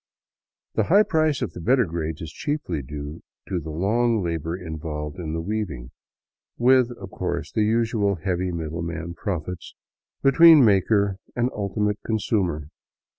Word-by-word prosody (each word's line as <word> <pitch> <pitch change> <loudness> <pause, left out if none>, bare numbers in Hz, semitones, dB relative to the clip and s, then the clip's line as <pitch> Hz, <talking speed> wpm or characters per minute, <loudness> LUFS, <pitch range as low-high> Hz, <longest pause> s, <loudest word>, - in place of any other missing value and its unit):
The 110 - +1
high 200 - +6
price 155 -7 +1
of 95 -9 -4
the 85 - -8
better 125 +5 +3
grades 80 -1 -4
is 80 -1 -6
chiefly 145 - -3
due 75 +4 -7 0.3
to 90 - -1
the 80 -1 -8
long 110 +7 +1
labor 85 0 -2
in 80 -4 -6
volved 75 0 -5
in 80 -3 -4
the 80 - -2
weaving, 80 - -4 0.7
with, 125 0 +4
of - - -9
course, - - -3
the - - 0
usual 110 -2 +1
heavy 90 +1 -2
middleman 85 +1 -4
profits 90 -1 -5 0.5
between 155 0 +8
maker 100 -1 +3 0.2
and 120 +1 +1
ultimate 105 0 -1
consumer. 95 -9 -1
95 Hz, 145 wpm, -24 LUFS, 80-115 Hz, 0.7 s, between